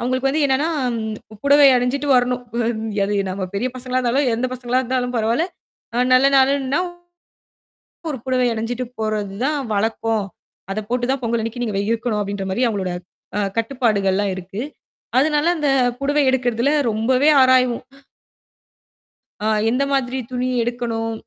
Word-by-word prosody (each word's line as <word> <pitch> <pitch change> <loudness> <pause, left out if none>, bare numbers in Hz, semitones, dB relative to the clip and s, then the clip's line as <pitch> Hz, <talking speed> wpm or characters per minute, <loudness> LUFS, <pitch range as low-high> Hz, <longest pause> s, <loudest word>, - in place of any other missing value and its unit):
அவுங்களுக்கு 255 +2 0
வந்து 305 +2 0
என்னான்னா, 270 +3 +1 0.3
ம் 220 -1 -6
புடவை 285 0 +7
அணிஞ்சுட்டு 260 +4 -1
வரணும். 250 0 +1 0.6
அது 205 +1 -1 0.2
நம்ம 185 0 -3
பெரிய 245 +6 0
பசங்களா 255 0 -2
இருந்தாலும், 255 +3 +1
எந்தப் 250 +2 -2
பசங்களா 250 0 0
இருந்தாலும் 250 0 -2
பரவாயில்லை.அ 235 +11 -1 0.5
நல்ல 255 +2 +6
நாளுன்னா 270 +1 +2 1.3
ஒரு 265 - -4
புடவை 255 -1 +2
அணிஞ்சுட்டு 235 +3 -3 0.2
போறது 215 -2 -2
தான் 300 -1 0 0.2
வழக்கம். 220 0 0 0.5
அதப் 210 +1 -4
போட்டுத் 245 0 0
தான் 270 - -2
பொங்கல் 235 -1 0
அன்னிக்கு 235 +2 -4
நீங்க 215 -3 -3
வெ - - +1
இருக்கணும் 225 -1 -1
அப்பிடின்ற 200 -1 -3
மாரி 235 +7 -1
அவுங்களோட 190 -4 -2 0.4
அ - - +1 0.2
கட்டுப்பாடுகள் 225 -5 +1
எல்லாம் 200 0 0
இருக்கு. 190 +3 -7 0.6
அதனால 295 +2 +2
அந்தப் 270 -5 +1
புடவை 290 +2 +2
எடுக்குறதுல 245 0 +1 0.2
ரொம்பவே 255 +7 +3
ஆராய்வோம். 255 -2 +3 1.6
அ - - +2 0.2
எந்த 255 +4 +1
மாதிரி 260 -1 0
துணி 250 0 -1 0.2
எடுக்கணும்? 230 -1 -2
245 Hz, 140 wpm, -20 LUFS, 220-260 Hz, 1.6 s, புடவை